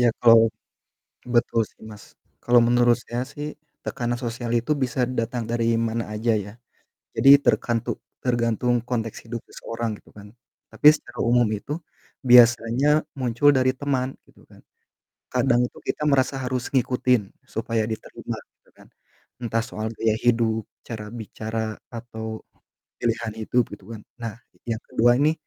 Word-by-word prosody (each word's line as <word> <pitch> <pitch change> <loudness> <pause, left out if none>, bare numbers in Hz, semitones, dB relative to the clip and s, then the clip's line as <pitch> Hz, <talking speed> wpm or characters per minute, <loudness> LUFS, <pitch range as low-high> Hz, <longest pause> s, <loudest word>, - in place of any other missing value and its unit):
Ya, 120 - +5 0.2
kalau 115 -1 +8 0.9
betul 115 -1 +3
sih, - - -22
Mas. 105 -1 -12 0.4
Kalau 120 0 +6
menurut 120 0 +4
saya 120 +1 -4
sih 145 +3 -7 0.3
tekanan 120 -2 -2
sosial 120 -1 -4
itu 120 +6 +1
bisa 130 -2 0
datang 120 -1 -3
dari 115 0 +1
mana 115 0 -1
aja 115 +2 +1
ya. 100 -1 -4 0.6
Jadi 135 - +5
terkantu 120 -1 0 0.2
tergantung 120 0 +1
konteks 115 -2 -3
hidup 115 0 -5
seseorang, 115 -2 -5
gitu - - -23
kan. 105 0 -12 0.4
Tapi - - +4
secara - - -12
umum 120 -2 +4
itu 105 +6 -5 0.5
biasanya 120 +1 +6 0.3
muncul 125 +3 +3
dari 130 0 +3
teman, 135 -2 -1 0.2
gitu - - -22
kan. - - -18 0.7
Kadang 125 -1 +2
itu - - -14
kita - - -2
merasa 135 0 +2
harus 125 -1 -2
ngikutin, 125 -2 +2 0.3
supaya 115 -1 0
diterima 110 - -6 0.2
gitu - - -30
kan. - - -19 0.5
Entah 115 -1 0
soal 110 -1 -5
gaya 110 0 +1
hidup, 115 -2 +2 0.2
cara 110 -3 -6
bicara, 110 -1 -4
atau 110 -2 -7 0.6
pilihan 115 -1 -1
hidup, 125 +3 +2
gitu - - -21
kan. 110 - -8 0.2
Nah, 115 -2 -4 0.3
yang 115 -1 -1
ke-2 120 +1 +4
ini 150 +2 +4
120 Hz, 145 wpm, -24 LUFS, 115-125 Hz, 0.9 s, kalau